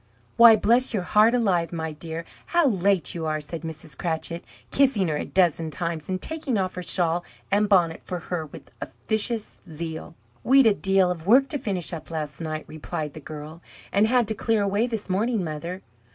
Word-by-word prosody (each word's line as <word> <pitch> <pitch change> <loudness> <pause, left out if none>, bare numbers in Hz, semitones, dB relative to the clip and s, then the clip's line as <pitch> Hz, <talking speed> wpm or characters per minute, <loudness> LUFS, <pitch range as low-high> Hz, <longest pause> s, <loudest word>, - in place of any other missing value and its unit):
"Why, 235 -1 +9
bless 240 +3 +2
your 190 - -1
heart 215 +6 +4
alive, 180 -8 +1
my 160 -2 -3
dear, 160 +2 -6 0.2
how 345 -2 +3
late 195 - +2
you 165 -2 -3
are!" 155 0 -1
said 160 +2 -7
Mrs. 160 -2 -6
Cratchit, 170 +1 -3 0.3
kissing 255 -10 +3
her 150 - 0
a - - -3
dozen 170 -3 +1
times, 165 0 -3
and 185 0 -1
taking 305 -2 -2
off 185 -1 -1
her 180 - -5
shawl 175 -1 0 0.3
and 205 +1 +2
bonnet 175 -5 +3
for 180 - -4
her 170 -2 -4
with - - -13
officious 215 - -3
zeal. 160 +1 -6 0.3
"We'd 270 +1 +6
a 220 - +6
deal 195 -2 +2
of 170 -1 -6
work 265 +5 +5
to 290 - -2
finish 190 -8 -3
up 160 -2 -7
last 155 -1 -5
night," 155 -1 -4
replied 155 -1 -5
the - - -8
girl, 155 +2 -9 0.3
"and 205 +2 +3
had 245 -1 +3
to - - 0
clear 220 0 0
away 200 +4 +1
this 225 -4 -4
morning, 210 +2 0
mother!" 170 +4 -5
180 Hz, 195 wpm, -25 LUFS, 160-215 Hz, 0.3 s, Why